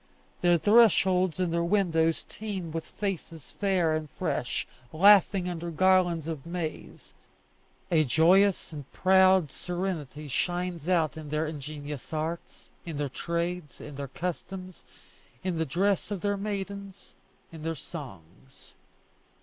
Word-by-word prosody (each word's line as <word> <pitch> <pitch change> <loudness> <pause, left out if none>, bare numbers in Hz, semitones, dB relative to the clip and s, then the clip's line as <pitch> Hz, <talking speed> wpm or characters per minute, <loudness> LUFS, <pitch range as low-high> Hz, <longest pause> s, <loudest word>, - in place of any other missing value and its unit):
Their 175 -1 +5
thresholds 185 -4 +4
and 180 -2 0
their 170 0 +1
windows 170 -4 +1
teem 195 -6 -5
with 165 0 -4
faces 175 -6 -5
fair 185 -5 +1
and 155 -1 -4
fresh, 145 -8 -2 0.3
laughing 195 +1 +5
under 170 -1 -4
garlands 175 -2 +3
of 155 -5 -4
maize; 170 -2 -6 0.8
a 160 -2 +5
joyous 175 +7 +3
and 145 -3 -9
proud 190 -4 +4
serenity 170 -6 -4
shines 175 +3 -2
out 165 -3 +2
in 155 -2 -8
their 155 +2 0
ingenious 150 -2 -7
arts, 160 +2 -5
in 165 -4 -6
their 145 -1 -1
trades, 170 +2 -3
in 150 - -9
their 140 0 -5
customs, 180 +4 -6 0.6
in 180 -3 -1
the 160 - 0
dress 190 +6 +1
of 200 -4 -4
their 205 0 +1
maidens, 200 -1 -6 0.4
in 165 -2 -10
their 165 +1 -2
songs. 130 - -11
170 Hz, 130 wpm, -28 LUFS, 155-185 Hz, 0.8 s, Their